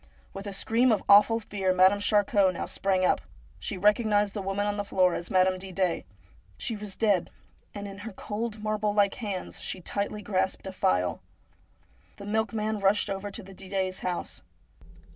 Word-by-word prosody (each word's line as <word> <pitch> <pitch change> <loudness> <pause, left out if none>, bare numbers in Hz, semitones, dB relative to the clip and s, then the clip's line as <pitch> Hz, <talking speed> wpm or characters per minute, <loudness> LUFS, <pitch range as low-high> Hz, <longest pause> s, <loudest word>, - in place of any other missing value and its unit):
With 195 +1 -7
a - - -4
scream 230 +5 +2
of 215 - +1
awful 210 +3 +7
fear 200 -3 -1
Madame 190 +2 +5
Charcot 205 -2 +3
now - - -3
sprang 190 -1 0
up. - - +2 0.4
She - - -4
recognised 210 0 +3
the 205 - -3
woman 195 +1 -1
on 205 0 0
the 205 - -1
floor 185 -3 +2
as 170 - -4
Madame 185 0 +3
Didet. 185 -2 -2 0.5
She 230 - -2
was 205 -2 -6
dead, 205 -6 +2 0.5
and 205 0 -5
in 200 0 -9
her 220 +2 -7
cold, 215 +2 -5
marble 215 -1 0
like 200 -1 +3
hand 200 -5 -5
she - - -4
tightly 205 +3 -3
grasped 190 -1 -1
a 190 - -4
phial. 90 - 0 0.9
The 200 - -10
milkman 215 0 -1
rushed 200 +1 +2
over 195 +1 -4
to 205 +2 -7
the 195 +1 -12
Didets' 190 0 -3
house. 180 -1 -4
200 Hz, 175 wpm, -28 LUFS, 190-210 Hz, 0.9 s, awful